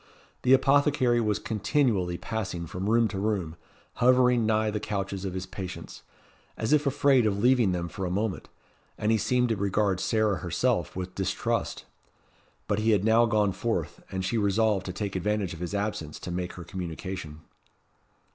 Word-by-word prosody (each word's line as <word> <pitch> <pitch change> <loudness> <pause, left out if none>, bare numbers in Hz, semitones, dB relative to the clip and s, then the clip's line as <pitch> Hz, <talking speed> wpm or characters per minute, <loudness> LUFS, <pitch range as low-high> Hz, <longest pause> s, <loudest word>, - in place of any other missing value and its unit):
The 130 - +4
apothecary 135 -2 +3
was 105 -2 +1
continually 105 -5 0
passing 95 -6 -4
from 90 +5 -4
room 115 0 +4
to 95 - -4
room, 95 -6 -1 0.5
hovering 125 -2 +4
nigh 110 0 +2
the 105 - -2
couches 100 -2 -3
of 95 -1 -4
his 95 0 -3
patients, 95 -1 -8 0.6
as 110 +6 0
if 150 -1 +3
afraid 135 -3 +3
of 100 -2 0
leaving 120 -2 +3
them 85 -1 -2
for 95 +2 -4
a - - -3
moment, 100 +1 -2 0.5
and 105 - 0
he 110 - +3
seemed 125 +3 +1
to 115 - +1
regard 100 -1 0
Sarah 110 0 +1
herself - - -1
with 90 0 -5
distrust. 95 -1 -2 0.8
But 100 - 0
he 110 +1 +1
had 100 -2 +2
now 115 +1 +5
gone 105 -2 +2
forth, 115 +4 -3
and 95 0 -2
she 110 +5 0
resolved 100 -1 +1
to - - -2
take 100 0 -4
advantage 100 0 -1
of 80 - -9
his 90 +3 -4
absence 100 -7 -3
to 90 - -5
make 90 0 -3
her 90 - -8
communication. 90 -3 -6
105 Hz, 175 wpm, -27 LUFS, 95-115 Hz, 0.8 s, now